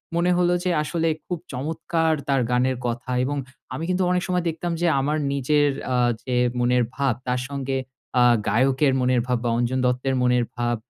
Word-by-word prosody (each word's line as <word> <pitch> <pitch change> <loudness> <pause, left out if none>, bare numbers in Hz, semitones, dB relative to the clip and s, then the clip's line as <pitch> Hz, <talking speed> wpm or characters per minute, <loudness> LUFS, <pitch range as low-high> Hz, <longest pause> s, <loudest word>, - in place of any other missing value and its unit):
মনে 175 +1 +2
হলো 175 0 +3
যে, 185 - 0
আসলে 165 +1 -1 0.2
খুব 180 -3 -3
চমৎকার 160 +4 -1
তার 135 -2 +2
গানের 125 +1 +1
কথা 120 +2 -4
এবং 145 +2 -2 0.4
আমি 160 - -4
কিন্তু 185 0 +1
অনেক 180 -1 +1
সময় 180 -1 0
দেখতাম 170 +2 -3
যে 175 - +3
আমার 150 +3 0 0.2
নিজের 145 +2 +2 0.2
অ্যা 125 - 0 0.3
যে 125 - -2 0.2
মনের 125 0 +3
ভাব 135 -2 +1
তার 125 0 0
সঙ্গে 135 -1 -2 0.4
অ্যা 125 - +5 0.3
গায়কের 135 +3 +3
মনের 125 -1 +2
ভাব 125 -1 +1
বা 120 - 0
অঞ্জন 125 +2 0
দত্তের 125 +1 0
মনের 125 -1 +2
ভাব 120 0 0
135 Hz, 180 wpm, -23 LUFS, 125-160 Hz, 0.4 s, অ্যা